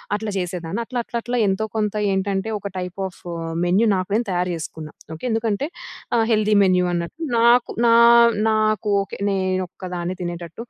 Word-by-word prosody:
అట్లా 215 Hz, 0 st, -4 dB
చేసేదాన్ని. 180 Hz, +2 st, -3 dB
అట్లా 245 Hz, 0 st, -3 dB
అట్లా 235 Hz, -, -5 dB
అట్లా 245 Hz, +1 st, -2 dB
ఎంతో 195 Hz, +3 st, 0 dB
కొంత 210 Hz, -1 st, -1 dB, 0.2 s
ఏంటంటే 195 Hz, +2 st, -1 dB
ఒక 200 Hz, -, -5 dB
టైప్ 180 Hz, 0 st, -5 dB
ఆఫ్ 180 Hz, -, -14 dB, 0.5 s
మెన్యూ 200 Hz, +6 st, +3 dB
నాకు 185 Hz, 0 st, -3 dB
నేను 235 Hz, -, +1 dB
తయారు 180 Hz, 0 st, 0 dB
చేసుకున్న. 160 Hz, -1 st, -7 dB, 0.3 s
ఓకే, 160 Hz, -, -8 dB
ఎందుకంటే 225 Hz, +4 st, -1 dB, 0.5 s
ఆ -, -, +3 dB
హెల్దీ 215 Hz, -1 st, +3 dB
మెన్యూ 180 Hz, -1 st, +3 dB
అన్నట్టు 170 Hz, -, -4 dB, 0.2 s
నాకు 235 Hz, +1 st, +4 dB, 0.2 s
నా 230 Hz, -, +5 dB, 0.6 s
నాకు 215 Hz, -1 st, +1 dB
ఓకే 195 Hz, -, -7 dB
నేనోక్కదాన్నే 185 Hz, -1 st, -3 dB
తినేటట్టు 175 Hz, +3 st, -6 dB
195 Hz, 155 wpm, -22 LUFS, 180-220 Hz, 0.6 s, నా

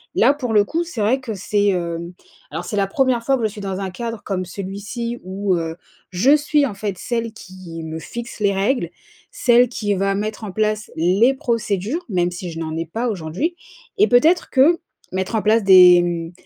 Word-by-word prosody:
Là 255 Hz, +6 st, +5 dB
pour 250 Hz, -6 st, -3 dB
le 210 Hz, -1 st, +5 dB
coup 330 Hz, +9 st, -1 dB
c'est 330 Hz, -10 st, -5 dB
vrai 230 Hz, +6 st, +2 dB
que 250 Hz, -4 st, -5 dB
c'est, 205 Hz, +1 st, 0 dB
hem, 170 Hz, -2 st, -3 dB, 0.4 s
alors 160 Hz, +4 st, -5 dB
c'est 210 Hz, -, -4 dB
la 200 Hz, -, +3 dB
1re 255 Hz, +2 st, +1 dB
fois 270 Hz, +3 st, +2 dB
que 240 Hz, -, -4 dB
je 220 Hz, -, +2 dB
suis 210 Hz, 0 st, -9 dB
dans 195 Hz, -1 st, -4 dB
un 195 Hz, -1 st, -3 dB
cadre 230 Hz, +2 st, -5 dB
comme 185 Hz, -2 st, -2 dB
celui-ci 205 Hz, +6 st, -5 dB
où, 190 Hz, +1 st, -1 dB
heu, 165 Hz, -1 st, -3 dB, 0.4 s
je 230 Hz, +11 st, +4 dB
suis 300 Hz, -1 st, +2 dB
en 210 Hz, -, -7 dB
fait 200 Hz, -2 st, -4 dB
celle 230 Hz, -2 st, -3 dB
qui 185 Hz, -5 st, -10 dB
me 160 Hz, 0 st, -5 dB
fixe 235 Hz, +8 st, -8 dB
les 200 Hz, -1 st, +2 dB
règles, 195 Hz, -1 st, 0 dB, 0.4 s
celle 245 Hz, 0 st, +4 dB
qui 205 Hz, -4 st, -1 dB
va 195 Hz, +1 st, 0 dB
mettre 215 Hz, +2 st, -4 dB
en 200 Hz, -, -6 dB
place 215 Hz, +1 st, -1 dB
les 185 Hz, +10 st, +3 dB
procédures. 230 Hz, -, -2 dB
Même 175 Hz, -3 st, +1 dB
si 180 Hz, 0 st, -6 dB
je 165 Hz, -, -7 dB
n'en 160 Hz, -1 st, -4 dB
ai 165 Hz, -, -2 dB
pas 230 Hz, +9 st, -3 dB
aujourd'hui 200 Hz, -, -3 dB, 0.4 s
et 420 Hz, -, +6 dB
peut-être 320 Hz, +9 st, +4 dB
que 290 Hz, +6 st, +5 dB, 0.3 s
mettre 190 Hz, +3 st, -3 dB
en 220 Hz, -, +1 dB
place 220 Hz, +1 st, +3 dB
des 180 Hz, -2 st, +8 dB
mmh, 170 Hz, -1 st, -3 dB
205 Hz, 210 wpm, -20 LUFS, 185-240 Hz, 0.4 s, des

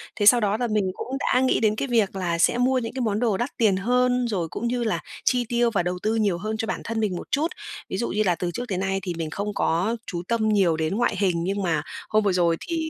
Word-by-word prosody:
Thế 205 Hz, -, 0 dB
sau 240 Hz, +3 st, +8 dB
đó 210 Hz, 0 st, +1 dB
là 245 Hz, 0 st, -1 dB
mình 215 Hz, -2 st, +1 dB
cũng -, -, -7 dB
đã 250 Hz, -, +2 dB
nghĩ 260 Hz, -, +2 dB
đến 215 Hz, -2 st, +2 dB
cái 275 Hz, -, -2 dB
việc 220 Hz, -5 st, +1 dB
là 175 Hz, -3 st, -1 dB
sẽ 240 Hz, -, +3 dB
mua 255 Hz, +1 st, +2 dB
những 230 Hz, -2 st, -5 dB
cái 260 Hz, -, -3 dB
món 215 Hz, -2 st, 0 dB
đồ 225 Hz, -6 st, +1 dB
đắt 240 Hz, +3 st, -1 dB
tiền 210 Hz, -5 st, +3 dB
hơn, 250 Hz, +3 st, +2 dB
rồi 185 Hz, -7 st, -1 dB
cũng 235 Hz, -, -3 dB
như 245 Hz, 0 st, -1 dB
là 220 Hz, -, 0 dB, 0.3 s
chi 245 Hz, -1 st, +2 dB
tiêu 240 Hz, -1 st, +2 dB
và 195 Hz, -, +1 dB
đầu 180 Hz, +1 st, -2 dB
tư 220 Hz, +1 st, +1 dB
nhiều 205 Hz, -6 st, +1 dB
hơn 215 Hz, +4 st, -3 dB
cho 225 Hz, -, -2 dB
bản -, -, -3 dB
thân 230 Hz, 0 st, -3 dB
mình 210 Hz, -4 st, 0 dB
một -, -, -7 dB
chút. 295 Hz, +3 st, +2 dB, 0.4 s
Ví -, -, -3 dB
dụ 235 Hz, -, -1 dB
như 215 Hz, +2 st, +1 dB
là 180 Hz, -4 st, +2 dB
từ 175 Hz, 0 st, -3 dB
trước 240 Hz, -, -4 dB
tới 190 Hz, -, -2 dB
nay 195 Hz, +1 st, -1 dB
thì 180 Hz, -, -3 dB
mình 160 Hz, -2 st, -3 dB
không 200 Hz, +5 st, -3 dB
có 190 Hz, +9 st, 0 dB
chú 170 Hz, -2 st, -3 dB
tâm 225 Hz, -2 st, +1 dB
nhiều 190 Hz, -6 st, +3 dB
đến 160 Hz, +4 st, -1 dB
ngoại 240 Hz, -3 st, +1 dB
hình, 180 Hz, -4 st, +1 dB
nhưng 195 Hz, +3 st, -1 dB
mà 165 Hz, -4 st, +1 dB, 0.3 s
hôm 215 Hz, 0 st, +3 dB
vừa 200 Hz, -2 st, +2 dB
rồi 170 Hz, -2 st, +2 dB
thì 325 Hz, -2 st, -3 dB
215 Hz, 290 wpm, -24 LUFS, 185-240 Hz, 0.4 s, sau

